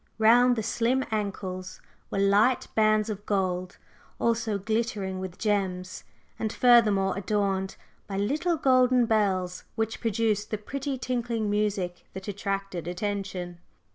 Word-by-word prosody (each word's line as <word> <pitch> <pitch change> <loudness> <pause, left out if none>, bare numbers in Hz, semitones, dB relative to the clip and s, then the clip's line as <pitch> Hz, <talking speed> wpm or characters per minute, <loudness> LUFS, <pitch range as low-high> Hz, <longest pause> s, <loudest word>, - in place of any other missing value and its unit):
Round 240 +3 +5
the 220 - -2
slim 240 +4 +1
ankles 190 -3 -4 0.3
were - - -3
light 200 +6 +3
bands 215 -1 +3
of 205 -2 -5
gold, 185 -2 -1 0.4
also 225 -2 0
glittering 200 -2 -2
with 185 -1 -6
gems, 190 -4 -2 0.3
and 220 -1 -1
furthermore 215 -7 +4
adorned 195 -1 -1 0.3
by 195 - -4
little 305 - 0
golden 255 -3 +4
bells 190 -5 0
which 225 0 -2
produced 220 -2 0
the 215 - -2
pretty 275 +6 -4
tinkling 235 -4 -2
music 205 -4 -1
that 190 +1 -8
attracted 195 -3 -3
attention. 185 -2 -4
205 Hz, 125 wpm, -27 LUFS, 190-230 Hz, 0.4 s, Round